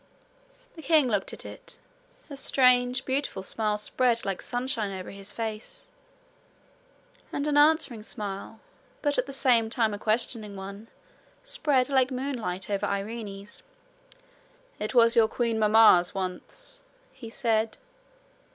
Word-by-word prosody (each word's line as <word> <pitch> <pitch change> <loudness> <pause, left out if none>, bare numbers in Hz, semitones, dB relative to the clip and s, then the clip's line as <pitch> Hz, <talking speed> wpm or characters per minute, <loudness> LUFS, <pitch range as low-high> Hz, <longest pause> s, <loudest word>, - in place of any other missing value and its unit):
The 325 - -10
king 305 -2 +3
looked 205 -5 -1
at - - -7
it. - - -9 0.5
A 285 - -8
strange 250 -1 +2
beautiful 260 -8 -2
smile 210 +1 0
spread 235 +2 +1
like 195 -2 -3
sunshine 245 -4 -2
over 185 -1 -7
his 200 +1 -6
face, 225 - -6 1.5
and 285 - -2
an 295 - 0
answering 290 -6 +3
smile, 210 0 -6 0.4
but 290 -3 +1
at 250 - -1
the - - -6
same 250 -5 +2
time 225 -2 0
a 205 - -5
questioning 215 -1 -1
one, 200 +3 -9 0.6
spread 290 - +1
like 265 -2 +2
moonlight 250 -9 -4
over 200 -1 -1
Irene's. 200 - -5 1.2
'It 215 +4 -4
was 230 -1 +5
your 225 -1 +5
queen 230 -1 -1
mamma's 210 -4 +6
once,' 190 - -6 0.3
he 260 -4 -10
said. 225 -2 0
230 Hz, 130 wpm, -27 LUFS, 210-260 Hz, 1.5 s, mamma's